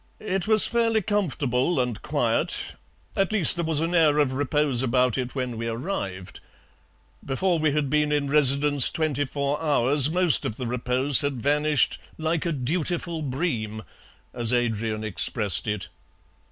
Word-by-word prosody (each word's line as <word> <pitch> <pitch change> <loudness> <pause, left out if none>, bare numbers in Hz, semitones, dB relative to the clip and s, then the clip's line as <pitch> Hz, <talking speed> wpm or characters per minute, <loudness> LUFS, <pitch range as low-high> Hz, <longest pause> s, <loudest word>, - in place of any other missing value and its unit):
It 195 -2 -3
was 215 -2 +8
fairly 230 -2 0
comfortable 160 - -1
and 125 -4 -2
quiet - - -1 0.4
at 195 0 0
least 200 -8 +6
there 170 -1 -2
was 160 -2 -1
an 165 +2 -2
air 155 -4 +3
of 145 -3 +1
repose 145 -2 0
about 125 -1 +1
it 125 0 -4
when 125 -3 -4
we 115 - -4
arrived. 115 - -5 0.8
Before 170 +5 -1
we 155 -1 +1
had 150 -1 -1
been 150 +1 0
in 145 -1 0
residence 145 -1 +2
twenty 150 -4 -2
four 140 +2 -3
hours 145 -2 +3
most 175 -4 +3
of 110 - -4
the 125 - -5
repose 125 +3 +1
had 140 -3 -3
vanished 150 +3 +1 0.2
'like 160 +1 -2
a - - -1
dutiful 165 +4 -3
bream,' 125 -7 -3 0.5
as 120 -1 -2
Adrian 110 -3 -1
expressed 105 -2 0
it. 105 -2 -4
145 Hz, 155 wpm, -24 LUFS, 125-160 Hz, 0.8 s, was